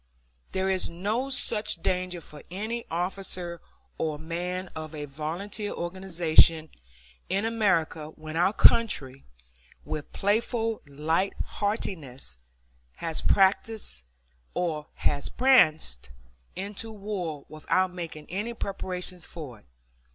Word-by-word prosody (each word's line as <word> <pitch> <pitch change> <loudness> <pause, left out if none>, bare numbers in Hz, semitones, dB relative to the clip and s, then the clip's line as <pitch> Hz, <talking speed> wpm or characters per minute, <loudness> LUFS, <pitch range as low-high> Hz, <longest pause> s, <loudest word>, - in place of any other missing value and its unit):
There 190 0 0
is 190 -1 +3
no 210 +10 -1
such 220 -5 +5
danger 180 0 -1
for 150 -1 -11
any 220 +6 -4
officer 175 0 -2 0.4
or 155 -2 -1
man 175 +3 -3
of 155 0 -6
a 150 -1 -4
volunteer 170 +9 -4
organization 170 -3 +3 0.6
in 195 +3 +1
America 175 -9 +1
when 155 0 -9
our 175 +3 +4
country, 140 - +4 0.6
with 150 -1 -5
playful 225 +2 0
light 160 +7 0
heartedness, 160 - -3 0.6
has 165 -2 -2
pranced 195 - +2 2.5
into 205 +3 -4
war 195 -8 -4
without 180 +4 0
making 165 -4 -6
any 210 +6 -2
preparation 185 -3 -3
for 150 -8 -8
it. - - -26
180 Hz, 100 wpm, -28 LUFS, 160-200 Hz, 2.5 s, such